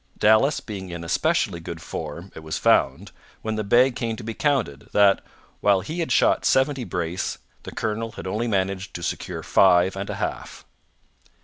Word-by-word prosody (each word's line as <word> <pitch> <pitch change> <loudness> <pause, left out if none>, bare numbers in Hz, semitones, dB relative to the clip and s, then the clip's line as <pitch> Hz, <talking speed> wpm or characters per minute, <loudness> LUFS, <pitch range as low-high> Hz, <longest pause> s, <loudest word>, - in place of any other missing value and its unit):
Dallas 110 +7 +4
being 95 -4 -7
in 85 -1 -6
especially 95 - 0
good 85 0 -7
form, 85 +2 -7
it - - -9
was 80 0 -4
found, - - +2 0.3
when 110 0 -2
the 110 - -2
bag 120 +5 +4
came 115 -2 -2
to 110 - -9
be 115 +1 -4
counted, 120 - -1
that, 100 -1 +5 0.4
while 100 -2 +3
he 160 - -5
had 165 - -2
shot - - +3
seventy 135 0 +2
brace, 90 -3 -3 0.2
the - - -8
colonel 110 +1 -3
had 90 - -8
only 110 +5 -2
managed 95 -2 -1
to 85 - -5
secure - - -4
five 90 0 +4
and 100 +1 -5
a 105 - -3
half! - - -5
100 Hz, 180 wpm, -24 LUFS, 90-115 Hz, 0.4 s, that